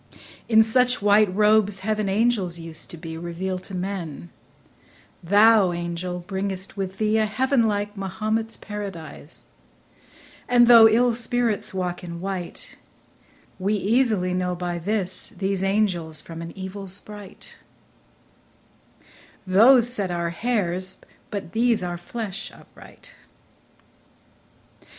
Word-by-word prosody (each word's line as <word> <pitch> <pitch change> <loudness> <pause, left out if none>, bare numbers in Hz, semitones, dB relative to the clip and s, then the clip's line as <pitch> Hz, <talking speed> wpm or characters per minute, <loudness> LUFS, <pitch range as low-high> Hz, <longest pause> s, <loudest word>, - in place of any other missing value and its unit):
In 220 -1 +6
such 250 +3 +2
white 205 0 +4
robes 210 0 +3
heaven's 215 0 -1
angels 200 -4 +1
used 165 -1 -5
to 170 - -7
be 160 0 -7
Revealed 180 +2 -4
to 195 - -6
men; 180 -4 -5 0.9
thou, 205 0 +5
angel, 175 +1 -4
bring'st 190 0 -4
with 195 -1 -4
thee 215 0 +1
A 215 - +2
heaven 245 +2 +1
like 205 0 -2
Mahomet's 215 +4 -2
paradise; 195 -7 -8 1.0
and 245 -1 +6
though 230 -2 +9
Ill 240 +3 +3
spirits 235 -1 0
walk 180 -1 -3
in 170 -1 -7
white, 185 -1 -6 0.8
we 200 +3 0
easily 210 -3 +1
know 180 0 -1
By 175 -1 -3
this 185 0 0
these 195 -1 -2
angels 185 -6 0
from 165 +2 -8
an 165 0 -7
evil 190 +1 -7
sprite; 200 +1 -5 1.9
Those 230 +6 +6
set 200 -6 -2
our 170 -1 -2
hairs, 185 -3 -2 0.3
but 200 -4 -5
these 230 -3 +2
our 175 -1 -4
flesh 215 +3 -6
upright. - - -16
195 Hz, 120 wpm, -24 LUFS, 180-215 Hz, 1.9 s, though